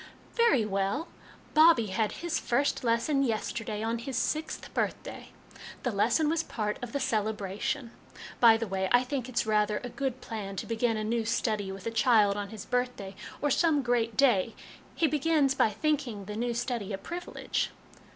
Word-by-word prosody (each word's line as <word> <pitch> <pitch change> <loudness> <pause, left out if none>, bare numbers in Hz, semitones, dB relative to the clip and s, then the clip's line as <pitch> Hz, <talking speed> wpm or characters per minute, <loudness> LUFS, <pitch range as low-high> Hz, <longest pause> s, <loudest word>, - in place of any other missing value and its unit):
" - - -26
Very 465 - +4
well: 200 - -1 0.4
Bobbie 310 - +6
had 215 +1 +1
his 340 -2 0
first 275 +3 0
lesson 235 +5 +2
yesterday 225 -3 -2
on 230 +1 -1
his 255 +2 -4
sixth 310 +1 -2
birthday. - - -3 0.5
The 250 - 0
lesson 230 +9 +2
was 325 +1 +1
part 210 -8 -3
of 245 -1 -5
the 280 - -1
celebration. 215 -1 -2 0.5
By 230 -2 +7
the 230 - -2
way, 190 -2 -2
I 245 +1 +5
think 255 -1 -3
it's 240 - 0
rather 210 -1 +2
a 245 - -4
good 265 -1 -3
plan 210 -5 -6
to - - -4
begin 230 0 0
a 215 - -2
new 230 +1 0
study 215 -3 -1
with 195 -1 -9
a 230 - -1
child 225 -4 +4
on 205 -1 -4
his 215 -2 -8
birth 250 0 0
day, 195 -1 -8 0.3
or 290 - +2
some 295 0 +3
great 235 -2 0
day; 235 -6 +3 0.4
he 330 - +2
begins 300 -2 +2
by 245 - +3
thinking 245 -3 -1
the 210 +1 -6
new 240 +1 -1
study 235 -4 -2
a - - -2
privilege." 345 - -3
230 Hz, 180 wpm, -29 LUFS, 210-275 Hz, 0.5 s, By